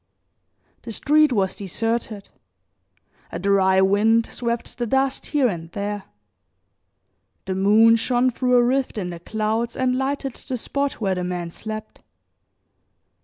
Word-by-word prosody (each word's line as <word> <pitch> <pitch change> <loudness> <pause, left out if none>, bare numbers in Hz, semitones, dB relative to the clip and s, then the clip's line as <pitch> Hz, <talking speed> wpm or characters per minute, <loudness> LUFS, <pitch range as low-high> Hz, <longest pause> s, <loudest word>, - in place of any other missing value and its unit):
The 230 - -8
street 300 +5 +3
was 195 -5 0
deserted, 215 +1 -3 1.0
a - - -4
dry 190 -1 +3
wind 215 +4 +3
swept 235 0 -4
the 240 - -1
dust 270 +3 0
here 290 -4 +2
and 165 -5 -5
there; 205 -1 -4 1.4
the 190 - -2
moon 215 +4 +5
shone 245 +2 +1
through 250 +1 +1
a 245 - +5
rift 260 0 0
in 180 -4 -3
the 170 - -8
clouds 220 +5 -2
and 255 -1 +1
lighted 270 0 -2
the 255 - -6
spot 280 +4 -2
where 195 -4 -1
the 180 -1 -3
man 175 -1 -4
slept. 215 +3 -8
225 Hz, 135 wpm, -22 LUFS, 195-250 Hz, 1.4 s, moon